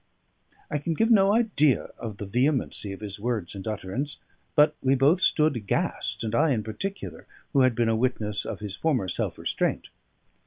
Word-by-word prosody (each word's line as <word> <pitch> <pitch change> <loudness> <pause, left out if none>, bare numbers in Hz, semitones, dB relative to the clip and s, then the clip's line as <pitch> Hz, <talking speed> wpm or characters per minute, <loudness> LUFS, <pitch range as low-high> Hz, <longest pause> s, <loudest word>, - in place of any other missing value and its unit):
I 150 - 0
can 165 +3 -2
give 225 +7 +2
no 195 -3 +6
idea 205 - +2
of 110 -3 -6
the 105 - -5
vehemency 125 -1 0
of 95 - -8
his 100 -1 -6
words 110 -5 -2
and 100 +1 -8
utterance; 110 +7 -3 0.4
but 150 -1 +5
we 135 +1 +3
both 145 +8 +4
stood 155 -5 +3
aghast, 105 0 -2
and 110 0 -3
I 150 +3 +3
in 110 -3 -1
particular, 195 - -6 0.3
who 140 - +4
had 130 -2 +4
been 120 -1 +2
a 115 - +2
witness 110 -3 0
of 105 -2 -6
his 100 -2 -5
former 130 -7 0
self 85 - -2
restraint. - - -1
125 Hz, 185 wpm, -26 LUFS, 105-150 Hz, 0.4 s, no